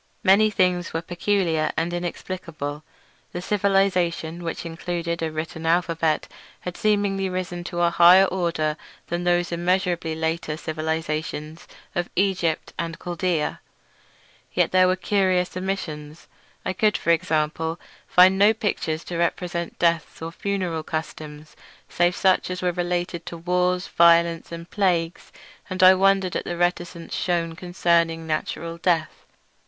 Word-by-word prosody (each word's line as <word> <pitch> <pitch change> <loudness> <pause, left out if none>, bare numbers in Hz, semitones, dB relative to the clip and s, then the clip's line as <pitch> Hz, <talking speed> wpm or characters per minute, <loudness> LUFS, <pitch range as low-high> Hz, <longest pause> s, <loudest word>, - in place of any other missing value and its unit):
Many 205 +3 +5
things 180 -4 +1
were 165 - -1
peculiar 175 -3 0
and 165 +2 0
inexplicable. 165 -4 -5 0.5
The 175 - -3
civilisation, 185 -5 +1
which 165 0 -4
included 170 0 -3
a 160 -1 -1
written 160 +1 -5
alphabet, 165 -2 +1 0.3
had 180 -1 -6
seemingly 200 -2 +1
risen 180 -1 -4
to 175 0 -3
a 170 0 +3
higher 180 +3 +7
order 170 -5 -1 0.3
than 175 +1 -2
those 175 0 +2
immeasurably 175 -1 0
later 160 -1 -2
civilisations 155 -1 -4 0.3
of 175 0 -2
Egypt 185 -4 0
and 165 0 -3
Chaldaea, 175 -2 -2 0.9
yet - - +2
there 185 0 +5
were 185 - +2
curious 185 -2 +1
omissions. 165 -5 -5 0.4
I - - -1
could, 210 +2 +2
for 170 - +1
example, 160 0 0 0.3
find 185 +2 +6
no 210 +2 +6
pictures 165 -7 -2
to 170 -1 -5
represent 170 0 -2
deaths 170 -2 0
or 165 +1 -5
funeral 185 -3 -2
customs, 155 -1 -6 0.3
save 175 +1 +2
such 185 -1 +2
as 180 0 -4
were 180 - +2
related 175 -1 -2
to 170 - -6
wars, 180 +2 0
violence, 170 0 +4
and 170 0 -7
plagues; 175 -5 -1 0.4
and 185 0 0
I 185 0 +10
wondered 195 -1 +2
at - - -2
the 175 - -4
reticence 175 -1 -2
shewn 170 -2 -1
concerning 170 -2 +1
natural 165 +1 -3
death. 165 -3 -1
175 Hz, 135 wpm, -24 LUFS, 165-185 Hz, 0.9 s, I